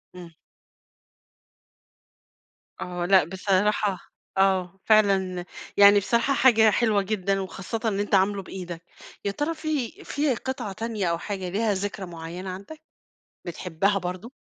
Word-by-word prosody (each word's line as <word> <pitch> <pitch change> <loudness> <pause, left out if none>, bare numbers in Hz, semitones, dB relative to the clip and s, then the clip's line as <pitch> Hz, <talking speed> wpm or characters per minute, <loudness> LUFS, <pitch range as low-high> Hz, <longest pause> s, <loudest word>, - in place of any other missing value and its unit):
إمم. 175 -2 -11 2.5
آه 180 -1 -3
لأ 190 0 +5
بصراحة 190 +3 0 0.4
آه 190 -1 +2
فعلًا 195 -4 +3 0.3
يعني 205 0 +8
بصراحة 235 +7 +1
حاجة 225 -5 +5
حلوة 215 -2 +2
جدًا، 195 -1 -1
وخاصةً 195 +4 -5
إن 205 -3 0
أنت 205 0 +1
عامله 195 +1 +2
بإيدك، 180 -3 -7 0.4
يا 200 - +1
ترى 295 +10 -2
في 305 -6 -2
في 285 -3 0
قطعة 245 -4 -4
تانية 220 -1 -3
أو 170 - 0
حاجة 190 0 -5
ليها 210 +3 0
ذكرى 200 0 -4
معيّنة 175 +2 -7
عندك، 200 +12 -9 0.7
بتحبها 180 +3 0
برضه؟ 185 +6 -6
195 Hz, 125 wpm, -25 LUFS, 185-220 Hz, 2.5 s, يعني